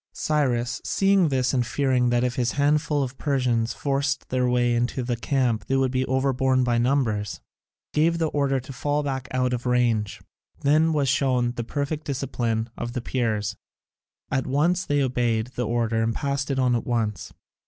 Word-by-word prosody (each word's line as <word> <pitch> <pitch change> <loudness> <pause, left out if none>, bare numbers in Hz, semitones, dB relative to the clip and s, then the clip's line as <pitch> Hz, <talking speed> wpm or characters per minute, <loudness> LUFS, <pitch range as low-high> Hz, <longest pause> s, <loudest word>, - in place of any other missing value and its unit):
Cyrus, 125 -6 0
seeing 195 -2 +3
this, 130 -2 0
and 125 -2 +2
fearing 125 0 +1
that 120 0 +2
if 125 0 -1
his 120 -1 0
handful 145 0 +1
of 130 0 -6
Persians 125 -5 0
forced 140 -3 -1
their 125 -1 +1
way 120 -1 +2
into 120 +2 -1
the 120 0 -1
camp 120 -2 0
they 135 - +1
would 135 -1 +2
be 130 0 0
overborne 130 0 +2
by 120 -1 +1
numbers, 115 -6 0 0.5
gave 165 +2 +2
the 165 -2 0
order 140 -2 +1
to 130 +2 -9
fall 145 +3 -1
back 130 -3 -3
out 125 -1 0
of 125 0 -3
range. 120 -4 +1 0.4
Then 155 +3 +3
was 145 -3 +1
shown 130 -2 +2
the 120 -1 -4
perfect 145 +5 -3
discipline 120 -5 -2
of 120 - -5
the 125 - -3
Peers; 110 -4 -1 0.8
at 130 -1 0
once 170 +7 +1
they 145 -1 +2
obeyed 120 -3 0
the 120 -1 -2
order 115 -1 0
and 115 0 0
passed 140 0 -2
it 135 - -1
on 125 -2 +2
at 115 - -3
once. 115 -4 -2
130 Hz, 180 wpm, -24 LUFS, 120-140 Hz, 0.8 s, seeing